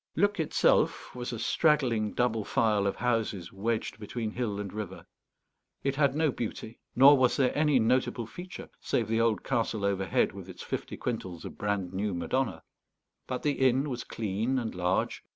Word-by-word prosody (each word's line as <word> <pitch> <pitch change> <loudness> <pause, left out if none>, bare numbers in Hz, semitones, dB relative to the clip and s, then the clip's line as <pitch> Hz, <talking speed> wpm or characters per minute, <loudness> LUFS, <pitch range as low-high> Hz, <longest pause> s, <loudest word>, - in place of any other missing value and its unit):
Luc 205 +3 +2
itself 160 - +2
was 125 0 -5
a 120 - -4
straggling 120 -4 +2
double 115 -3 +1
file 105 -2 +2
of 100 - -1
houses 110 -7 -1
wedged 110 +3 -2
between 110 +1 -4
hill 110 -4 -2
and 100 -2 -5
river. 105 -3 -6 0.8
It 135 0 0
had 140 -1 +2
no 155 -2 +2
beauty, 115 -1 -5 0.2
nor 140 +3 +9
was 130 -2 +3
there 130 -2 +2
any 150 -2 +3
notable 120 0 +1
feature, 180 +10 -9
save 115 - 0
the 115 +1 +1
old 115 -2 +1
castle 115 -5 -1
overhead 95 -2 +1
with - - -10
its - - -9
fifty - - -4
quintals 90 -3 -4
of - - -7
brand 100 -3 -2
new 100 0 -1
Madonna. 90 -2 -1 0.6
But 130 -1 -3
the 145 -1 0
inn 135 +3 0
was 125 -1 -4
clean 110 +4 -2
and 115 -3 -2
large. 90 +1 0
115 Hz, 170 wpm, -29 LUFS, 105-130 Hz, 0.8 s, nor